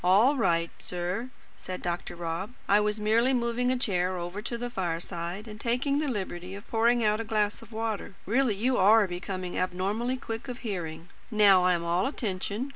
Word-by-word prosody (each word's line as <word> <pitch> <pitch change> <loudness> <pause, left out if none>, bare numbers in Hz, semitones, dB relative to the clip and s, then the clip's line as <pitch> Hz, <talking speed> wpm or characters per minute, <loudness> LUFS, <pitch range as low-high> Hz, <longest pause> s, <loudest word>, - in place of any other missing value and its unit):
"All 205 +10 +5
right, 170 -9 +1
sir," 180 +7 -3 0.3
said 185 0 -7
Dr. 175 0 -3
Rob. 170 +6 -4
"I 205 - +5
was 210 0 0
merely 230 +5 +3
moving 245 0 +1
a 255 - +1
chair 185 -6 0
over 175 +4 -4
to 235 +2 -3
the 245 +1 -4
fireside, 175 +1 -3
and 215 0 -9
taking 260 +4 +1
the 305 - 0
liberty 190 -5 -4
of 200 +3 -10
pouring 235 +1 +3
out 210 +1 +2
a - - -3
glass 210 -2 0
of 230 0 -14
water. 220 -3 -3
Really 235 0 +2
you 245 +5 +1
are 210 +3 +6
becoming 180 0 -4
abnormally 195 +8 -1
quick 225 -1 -6
of 250 -1 -6
hearing. 170 -5 -4 0.2
Now 205 -4 +6
I 180 - +5
am 170 - -3
all 170 +4 +1
attention. 215 0 -3
210 Hz, 190 wpm, -28 LUFS, 180-235 Hz, 0.3 s, are